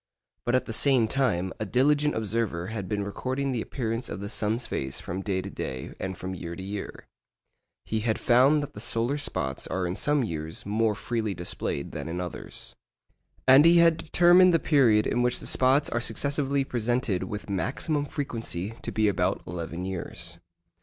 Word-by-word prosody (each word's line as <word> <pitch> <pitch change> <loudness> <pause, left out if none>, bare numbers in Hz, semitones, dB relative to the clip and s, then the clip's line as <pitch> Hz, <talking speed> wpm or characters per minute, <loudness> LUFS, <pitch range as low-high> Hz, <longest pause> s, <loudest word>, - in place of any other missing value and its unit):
But 120 - +2
at 130 - +1
the 115 - -5
same 130 -2 +3
time, 105 -8 0
a 110 - -2
diligent 145 +5 +3
observer 110 -5 -2
had 100 -5 -4
been 105 -1 -1
recording 130 +7 -2
the 120 -3 -1
appearance 115 -1 -3
of - - -5
the 100 +2 -6
sun's 110 +3 -1
face 65 0 -3
from 95 +2 -5
day 95 -2 -1
to 100 - -6
day 65 -5 -5
and 95 -1 -4
from 95 +1 -5
year 85 -1 -6
to 95 - -7
year. 100 +1 -6 0.8
He 110 - -1
had 110 0 0
found 135 +5 +4
that 145 - -7
the - - -9
solar 115 +5 -1
spots 65 - -3
are 95 -1 -1
in 90 +1 -2
some 145 +2 +1
years 80 -6 -5
more 110 +1 +1
freely 110 -2 -2
displayed 85 -4 -3
than 75 +1 -5
in 85 +2 -3
others. 90 -3 -6 0.7
And 135 +3 +9
he 170 +1 +7
had 170 -1 +6
determined 175 +2 +5
the - - +6
period 125 -10 +4
in 120 - +1
which 125 0 +2
the - - -9
spots 135 +3 +3
are 120 - 0
successively 140 +4 +1
presented 120 -6 0
with 105 +2 -6
maximum 140 - 0
frequency 115 - -3
to - - -4
be 110 -1 +2
about 100 - 0
eleven 85 0 -5
years. 85 -2 -5
110 Hz, 185 wpm, -27 LUFS, 95-135 Hz, 0.8 s, And